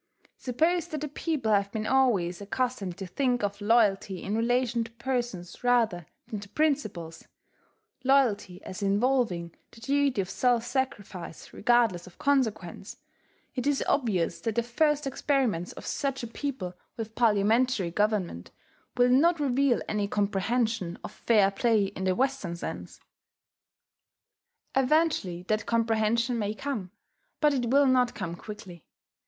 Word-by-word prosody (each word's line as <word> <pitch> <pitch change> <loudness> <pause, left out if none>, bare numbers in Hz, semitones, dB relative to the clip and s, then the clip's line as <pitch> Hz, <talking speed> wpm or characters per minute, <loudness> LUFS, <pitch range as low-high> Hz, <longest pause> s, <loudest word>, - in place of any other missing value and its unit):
Suppose 325 +8 0
that 305 -3 -5
a - - -1
people 295 -5 -2
have 200 0 +2
been 220 -1 -3
always 210 -9 +2
accustomed 205 -4 -2
to 195 - -5
think 245 +4 0
of 200 0 -2
loyalty 205 -4 +2
in 205 - -2
relation 240 0 +1
to 230 - -9
persons 235 -8 -4
rather 225 -9 +2 0.2
than 220 -4 -5
to 200 0 -11
principles, 215 - -1 0.8
loyalty 250 -9 +2
as 185 - -7
involving 200 -5 +1 0.2
the - - -16
duty 275 0 +1
of 190 - 0
self 240 +4 +1
sacrifice 205 - -4
regardless 225 -7 +2
of 180 - -15
consequence, 220 -10 -1 0.6
it 255 0 -2
is 290 -1 +2
obvious 210 - 0
that 225 -2 -2
the 235 - +2
first 295 +5 +1
experiments 260 - 0
of - - -10
such 275 -3 -2
a - - -3
people 235 -7 -4 0.2
with 225 -1 -5
parliamentary 220 -2 +2
government 200 - -1 0.5
will 245 0 +5
not 330 +6 +4
reveal 275 -2 +2
any 205 -1 -1
comprehension 205 -1 0
of - - -6
fair 210 -4 +3
play 220 +1 +2
in 190 -1 -5
the 185 -1 +2
Western 265 -9 -1
sense. 170 - -7 1.8
Eventually 265 - +2
that 215 +3 -1
comprehension 230 +1 +1
may 210 0 -2
come; 225 -8 -4 0.5
but 300 -2 +4
it 245 -4 -1
will 280 +3 +5
not 250 -2 +3
come 185 -4 -4
quickly. 190 -3 -10
230 Hz, 140 wpm, -28 LUFS, 195-260 Hz, 1.8 s, will